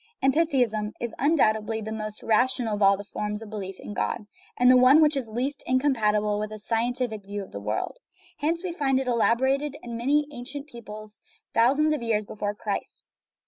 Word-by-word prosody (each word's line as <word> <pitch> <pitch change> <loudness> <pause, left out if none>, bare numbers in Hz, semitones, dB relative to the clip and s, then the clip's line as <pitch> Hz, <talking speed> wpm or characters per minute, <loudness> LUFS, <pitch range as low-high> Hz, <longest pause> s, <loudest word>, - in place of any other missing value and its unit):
Amphitheism 260 -8 +2
is 235 -2 -3
undoubtedly 220 -7 +2
the 220 0 -5
most 215 -1 -5
rational 240 0 +2
of 205 - -3
all 195 0 +6
forms 210 +1 -4
of 220 - -11
belief 195 -3 -6
in - - -7
God, 210 +2 -2 0.3
and 250 0 +6
the - - +7
one 255 +4 +7
which 305 -1 +4
is 255 -5 -2
least 260 +6 -2
incompatible 215 -6 +2
with 215 0 -3
a 215 - -6
scientific 230 0 -1
view 200 +1 -5
of - - -13
the 100 - -6
world. 105 - -3 0.4
Hence 330 +4 0
we 365 - -2
find 275 -5 +1
it 265 - -3
elaborated 265 +5 +1
in 235 -1 -6
many 290 +5 +2
ancient 275 +2 -7
peoples 215 -5 -10 0.3
thou 235 +4 +4
sands 305 +1 +3
of 300 - -2
years 220 -2 0
before 205 0 -4
Christ. 205 -1 -5
235 Hz, 185 wpm, -26 LUFS, 210-270 Hz, 0.4 s, the